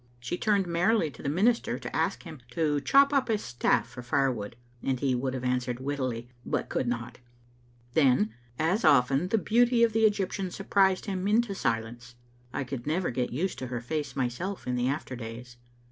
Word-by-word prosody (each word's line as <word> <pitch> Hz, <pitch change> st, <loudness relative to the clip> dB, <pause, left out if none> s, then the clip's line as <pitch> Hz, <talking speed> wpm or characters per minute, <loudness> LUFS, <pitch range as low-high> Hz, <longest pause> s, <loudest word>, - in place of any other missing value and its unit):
She 120 Hz, +8 st, -3 dB
turned 200 Hz, 0 st, +2 dB
merrily 175 Hz, 0 st, +2 dB
to -, -, -13 dB
the 140 Hz, -, -2 dB
minister 215 Hz, +10 st, +2 dB
to -, -, -7 dB
ask -, -, 0 dB
him 160 Hz, -5 st, -9 dB
to 150 Hz, -2 st, +1 dB
chop 280 Hz, -, +5 dB
up 275 Hz, -2 st, +2 dB
his 215 Hz, -3 st, 0 dB
staflE 120 Hz, -, +1 dB
for 125 Hz, -, -10 dB
firewood, 120 Hz, -4 st, 0 dB, 0.3 s
and 130 Hz, -2 st, -1 dB
he 135 Hz, -1 st, +1 dB
would 130 Hz, +1 st, -1 dB
have 130 Hz, -, -5 dB
answered 125 Hz, -1 st, -1 dB
wittily 130 Hz, -4 st, -3 dB, 0.2 s
but -, -, -2 dB
could 125 Hz, -, -1 dB
not. 120 Hz, 0 st, -4 dB, 0.7 s
Then, 125 Hz, -8 st, +3 dB, 0.2 s
as 180 Hz, +8 st, +1 dB
often, 135 Hz, +5 st, +4 dB
the 225 Hz, -, +2 dB
beauty 235 Hz, +3 st, +3 dB
of 230 Hz, -2 st, +3 dB
the 225 Hz, 0 st, +4 dB
Egyptian 195 Hz, -2 st, -2 dB
surprised 190 Hz, 0 st, +2 dB
him 190 Hz, -1 st, -2 dB
into 220 Hz, 0 st, +2 dB
silence. 120 Hz, -5 st, -3 dB, 0.4 s
I -, -, -2 dB
could 125 Hz, -1 st, -6 dB
never 170 Hz, +1 st, 0 dB
get 125 Hz, 0 st, -1 dB
used 170 Hz, +10 st, -2 dB
to 130 Hz, -, -4 dB
her 120 Hz, -1 st, -3 dB
face 145 Hz, +5 st, -4 dB
myself 135 Hz, +10 st, -3 dB
in 125 Hz, -, -1 dB
the 125 Hz, 0 st, 0 dB
after 135 Hz, -1 st, -3 dB
days. 120 Hz, +1 st, -8 dB
140 Hz, 190 wpm, -28 LUFS, 125-195 Hz, 0.7 s, chop